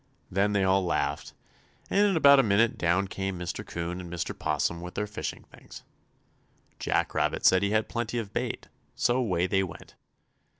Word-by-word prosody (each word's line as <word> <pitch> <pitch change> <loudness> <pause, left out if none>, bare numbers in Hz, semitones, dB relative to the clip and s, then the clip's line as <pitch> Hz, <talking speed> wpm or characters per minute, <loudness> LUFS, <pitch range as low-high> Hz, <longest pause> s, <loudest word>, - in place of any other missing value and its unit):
Then 100 +2 +1
they 100 -1 +2
all 95 0 +3
laughed, 75 -5 -2 0.5
and 205 +1 +3
in 195 -4 +1
about 140 -2 +7
a - - +8
minute 110 0 +2
down 90 +3 +1
came 95 -1 -4
Mr. 90 -1 -5
'Coon 85 +1 -5
and 85 -1 -9
Mr. 85 -2 -3
'Possum 85 0 -1
with 90 +1 -8
their 105 - -1
fishing 105 -8 -6
things. - - -14 1.0
Jack - - 0
Rabbit - - 0
said 95 - +6
he 100 - +1
had 110 +1 +1
plenty 120 0 -3
of 110 -4 -4
bait, - - -3 0.3
so 120 - +2
away 95 -9 +1
they 95 +1 +1
went. 90 -4 -7
95 Hz, 180 wpm, -28 LUFS, 90-110 Hz, 1.0 s, a